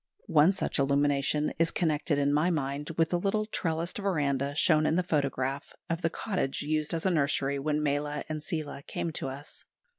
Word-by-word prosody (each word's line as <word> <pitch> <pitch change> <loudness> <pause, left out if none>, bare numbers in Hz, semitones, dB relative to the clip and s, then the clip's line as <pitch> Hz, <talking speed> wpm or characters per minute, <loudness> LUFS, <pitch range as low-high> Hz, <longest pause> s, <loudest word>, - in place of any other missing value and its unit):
One 155 +3 +5
such 195 -5 -2
illumination 140 +1 +2
is 165 0 +4
connected 155 -3 0
in 145 0 +2
my 155 +4 +3
mind 145 -2 -2
with 165 -1 +3
the 175 - +2
little 210 +3 0
trellised 170 -3 -2
verandah, 145 -8 0
shown 155 -1 +4
in - - +2
the 180 - +2
photograph, 140 -4 -1 0.2
of 165 +1 -1
the 165 - +1
cottage 180 -8 -2
used 155 +1 0
as 165 - -3
a 190 - +3
nursery 140 -3 +1
when 150 +1 0
Mala 145 0 -1
and 155 -1 -4
Seela 155 -4 -4
came 170 +3 -4
to 145 - -3
us. 140 +2 -8
150 Hz, 185 wpm, -29 LUFS, 140-165 Hz, 0.2 s, One